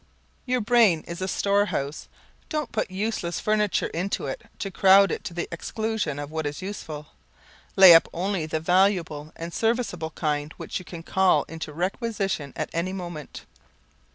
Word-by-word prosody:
Your 250 0 +1
brain 215 -7 +4
is 170 +1 -7
a 185 - -1
storehouse, 200 -8 0 0.4
don't 305 -1 -2
put 215 - -1
useless 185 -3 -2
furniture 210 -1 +1
into 180 +4 -2
it 135 - -4 0.2
to 195 - -4
crowd 195 0 +6
it - - -3
to - - -5
the 175 - -2
exclusion 215 -2 -3
of 145 0 -6
what 160 -1 -2
is 145 - -5
useful. 160 -6 -7 0.7
Lay 190 -3 +10
up 165 - +6
only 180 -2 -2
the 160 0 -1
valuable 170 -3 +1
and 165 +1 -7
serviceable 225 -8 -1
kind 150 -2 -2
which - - -4
you 185 - -12
can 165 0 -9
call 190 +2 +3
into 160 -2 -7
requisition 190 - -2
at - - -4
any 170 +3 -1
moment. 175 -6 -7
180 Hz, 160 wpm, -25 LUFS, 160-200 Hz, 0.7 s, Lay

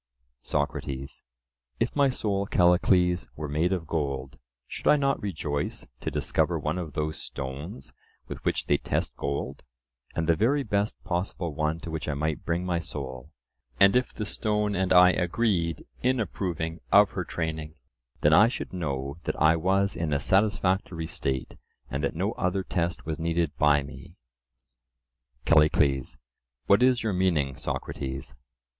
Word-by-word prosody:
SOCRATES: 70 +2 -3 0.6
If - - 0
my 140 -2 +4
soul, 100 -5 -1
Callicles, 90 0 +3
were 75 0 -4
made 80 +5 +1
of 90 -4 -1
gold, 70 -5 -3 0.3
should - - -6
I - - +7
not 140 -1 +1
rejoice 75 -7 -3
to - - -3
discover - - 0
one 80 +4 -2
of 80 -5 -6
those 75 +1 -2
stones 70 - -7 0.3
with - - -7
which - - 0
they - - +3
test - - -2
gold, 70 -1 -3 0.5
and 80 0 -1
the 85 - +4
very 135 - +2
best 105 -2 0
possible 85 -2 -2
one 75 +2 -1
to 85 - -6
which 80 -2 -4
I 75 - -1
might 75 +1 -2
bring 85 +2 -1
my 90 -2 0
soul; 65 -5 -7 0.5
and 100 +3 +6
if 125 0 +2
the 105 - -4
stone 105 0 0
and 95 -1 0
I 90 0 +8
agreed 90 -3 0 0.2
in 130 0 +2
approving 85 -5 -3
of 100 0 +7
her 95 - -3
training, 80 -2 -4 0.5
then 75 - +5
I 105 +7 +8
should 120 - -5
know 70 -4 -3
that - - -2
I 80 +2 +5
was 95 +4 +1
in 80 -3 -1
a 70 - +2
satisfactory 95 -3 +1
state, 65 -5 -3 0.3
and 70 +2 -2
that 70 - -1
no 95 +6 0
other 95 -1 -1
test 85 -2 -2
was 80 -2 -3
needed 85 -2 0
by 75 -1 +4
me. 70 - -11 1.3
CALLICLES: 70 -5 +3 0.5
What 100 - +5
is 125 -1 +4
your 110 -3 0
meaning, 85 -8 +1
Socrates? 65 +1 -5
85 Hz, 155 wpm, -27 LUFS, 75-95 Hz, 1.3 s, I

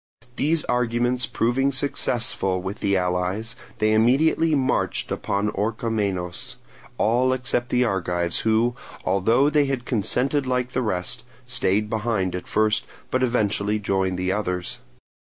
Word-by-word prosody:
These 155 +1 +1
arguments 125 +1 +1
proving 130 +4 +1
successful 120 -8 0
with 95 +2 -5
the 100 -1 +2
allies, 90 +5 -1 0.2
they 110 0 +2
immediately 145 +8 +3
marched 130 -2 0
upon 100 +1 -1
Orchomenos, 105 -4 -2 0.4
all 125 +4 +3
except 125 -1 -1
the 125 0 +3
Argives, 90 -5 0
who, 115 +2 +2 0.3
although 105 +9 +3
they 150 -1 +4
had 135 -3 -2
consented 130 +5 0
like 125 -1 0
the 130 - 0
rest, 90 -6 -2 0.2
stayed 110 -5 +1
behind 105 -4 -1
at 90 - -5
first, 105 -1 +2 0.3
but 130 - +1
eventually 105 -4 +1
joined 95 -3 0
the 90 +1 0
others. 90 -3 -2
110 Hz, 130 wpm, -24 LUFS, 95-125 Hz, 0.4 s, they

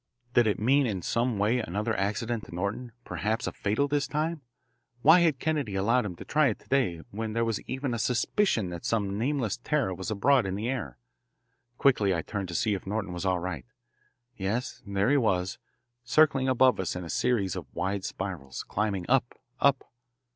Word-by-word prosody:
Did 120 -3 +5
it 105 - +1
mean 135 +4 +3
in 95 -6 -3
some 120 -1 0
way 110 +5 +2
another 105 +2 -2
accident 110 +3 -1
to - - -10
Norton 100 +7 -3
perhaps 110 +2 -2
fatal 110 +8 0
this 145 -1 0
time? 155 +2 -2 0.6
Why 160 +5 +8
had 165 -5 +3
Kennedy 145 -8 -1
allowed 115 +5 +2
him 90 - -6
to - - -10
try 150 -1 +3
it 110 - -1
to - - -24
day 120 -12 +1
when 110 +1 -4
there 115 +1 +1
was 115 -2 -1
even 130 -1 -2
a 120 - -2
suspicion 120 - +1
that 85 -1 -7
some 100 -3 -1
nameless 125 -4 0
terror 125 -5 0
was 95 +3 -5
abroad 110 +2 +3
in 95 - -2
the 105 +4 -3
air? 115 - -3 0.8
Quickly 105 -9 +3
I 80 - -2
turned 100 -2 -4
to 85 - -6
see 105 +4 +1
if 95 -1 -5
Norton 100 -2 -2
was 90 +2 -3
all 95 -1 +2
right. 90 +4 -5 0.7
Yes, 105 +5 -3
there 100 +4 +1
he 145 - +5
was, 95 -7 0 0.4
circling 135 0 +3
above 130 -3 +4
us 95 -2 -2
in 90 - -4
a - - -7
series 100 0 0
of 85 -7 -6
wide 95 0 -2
spirals, 90 -12 -5
climbing 100 -4 -2
up, 125 -2 +2 0.2
up. 140 -2 +3
110 Hz, 190 wpm, -28 LUFS, 95-130 Hz, 0.8 s, Why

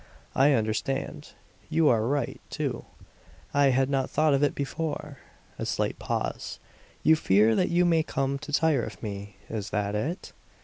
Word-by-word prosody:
"I 140 +2 +5
understand. 110 +4 -2 0.4
You 160 -1 +3
are 115 -2 +2
right, 140 -2 -1
too. - - -3 0.7
I 145 0 +4
had 135 0 +3
not 135 -1 0
thought 155 -1 +3
of 140 - +2
it 145 - +2
before." 150 0 -4 0.4
A - - -2
slight - - -1
pause. - - -3 0.5
"You 160 - +6
fear 110 -5 +4
that 185 - +2
you 175 +1 +3
may 165 -2 +4
come 140 -3 -1
to 150 +1 -8
tire 150 -3 +3
of - - -7
me; 100 -1 -6
is 105 -3 -4
that 105 -1 -1
it?" 150 - -3
135 Hz, 165 wpm, -27 LUFS, 110-155 Hz, 0.7 s, You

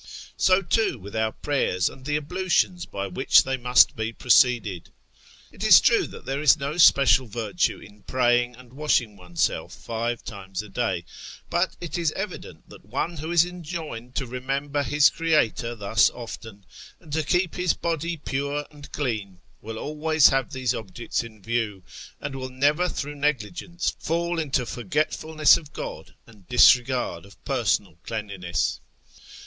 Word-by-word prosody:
So, 185 +1 +3
too, 200 - +1
with 100 0 -10
our 110 0 0
prayers, 110 -13 0
and 130 - -8
the 150 0 -1
ablutions 180 +3 0
by 100 0 -4
which 100 +7 +4
they 135 - -1
must 125 0 +4
be 110 0 -3
proceeded. 115 -6 +2 0.6
It - - -9
is - - +9
true - - +3
tliat - - -12
there 135 +2 -2
is 150 0 +6
no 140 +2 -4
special 135 -5 +6
virtue 105 -4 -1
in 105 0 -15
praying 120 0 +1
and 125 0 -16
washing 130 -7 0
oneself 90 -3 -2
five 115 +1 -4
times 95 -2 -6
a 105 - -12
day; 95 -6 -2 0.5
but 175 +2 0
it 175 0 -4
is 165 -3 +1
evident 195 -2 -7
that - - -14
one 140 - -3
who 155 +3 -5
is 170 -1 +5
enjoined 160 -9 -7
to 135 - -1
remember 135 +3 -2
his 145 +2 +4
Creator 150 -8 0
thus 105 0 +3
often, 110 -4 -10 0.3
and 150 - -12
to 160 - +1
keep 175 +3 0
his 180 -1 0
body 170 0 -2
pure 140 +1 -3
and 145 -1 -13
clean, 110 -9 -3 0.2
will 110 +1 -7
always 155 +2 +3
have 135 -2 0
these 130 -2 -1
objects 115 +2 -4
in 110 -4 -13
view, 110 -4 -2 0.4
and 140 -1 -5
will 130 -1 -5
never 145 +7 +1
through 145 -2 -4
negligence 150 - -2
fall 170 +1 -1
into 135 -5 0
forgetfulness 155 +3 +2
of 150 -3 -12
God - - -7
and 105 -6 -19
disregard 125 +1 +4
of 100 0 -18
personal 80 - 0
cleanliness. 95 -6 -3
130 Hz, 155 wpm, -25 LUFS, 110-155 Hz, 0.6 s, is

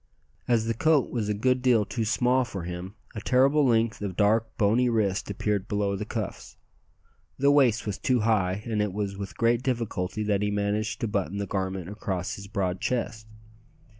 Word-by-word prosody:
As 115 -2 +2
the 115 - 0
coat 150 +3 +2
was 110 -4 -2
a - - +2
good 125 +4 +1
deal 120 -5 +3
too 115 0 -2
small 125 +4 +2
for 100 -7 -6
him, 90 +3 -6 0.2
a 110 - -6
terrible 135 +6 +4
length 115 -4 +2
of 100 -3 -3
dark, 110 +2 +2
bony 115 +4 +3
wrist 105 -5 0
appeared 100 0 -1
below 100 -1 0
the 105 - -4
cuffs. 110 -5 -5 0.8
The 140 +1 +4
waist 130 -6 +3
was 105 -2 -3
too 125 -3 +1
high, 105 -3 +1
and 110 -3 -1
it 105 -3 -1
was 100 -1 -3
with 100 -1 -7
great 115 0 +2
difficulty 110 -6 -2
that 105 -1 +1
he 105 - +1
managed 105 +1 -1
to 115 - 0
button 100 -2 -2
the 100 - -2
garment 95 -3 -3
across 95 -2 -3
his 100 0 -8
broad 95 -3 -2
chest. 110 -3 -2
105 Hz, 190 wpm, -27 LUFS, 100-115 Hz, 0.8 s, terrible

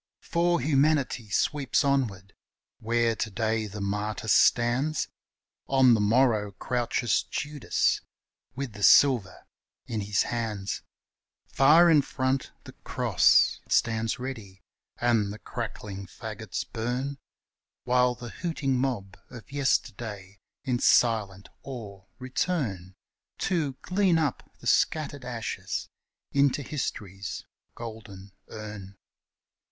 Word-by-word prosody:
For 170 0 +1
Humanity 140 -5 +1
sweeps 140 - +1
onward: 110 -9 0 0.5
where 115 0 +1
to 110 - -2
day 110 0 -1
the 105 +1 -8
martyr 105 +2 -3
stands, 125 +8 +3 0.6
On 130 -2 +5
the 110 - +3
morrow 110 -2 +2
crouches 120 +2 0
Judas 145 -2 -1 0.5
with 135 -4 -4
the 105 - -10
silver 120 -3 +5 0.4
in 115 -4 -3
his 100 0 +1
hands; 110 -4 -3 0.6
Far 155 +6 +6
in 155 -3 +6
front 130 0 -1
the - - -11
cross - - +3
stands 115 0 +1
ready 110 -7 -7 0.3
and 115 -4 +1
the 105 - -7
crackling 105 -4 -6
fagots - - -6
burn, 125 +5 -3 0.6
While 125 0 +3
the 120 -1 -8
hooting 140 -6 -2
mob 110 -8 -2
of 125 +2 -12
yesterday 110 -8 -2 0.2
in 125 -4 0
silent 105 -7 +2
awe 105 -8 -8
return 125 - -2 0.4
To 160 -7 0
glean 185 -2 +2
up 150 -6 -2
the - - -13
scattered 145 -4 +1
ashes 110 -5 -4 0.4
into 140 0 +2
History's 100 - -5 0.3
golden 105 -4 -9 0.2
urn. 105 -3 -9
120 Hz, 105 wpm, -27 LUFS, 105-135 Hz, 0.6 s, Far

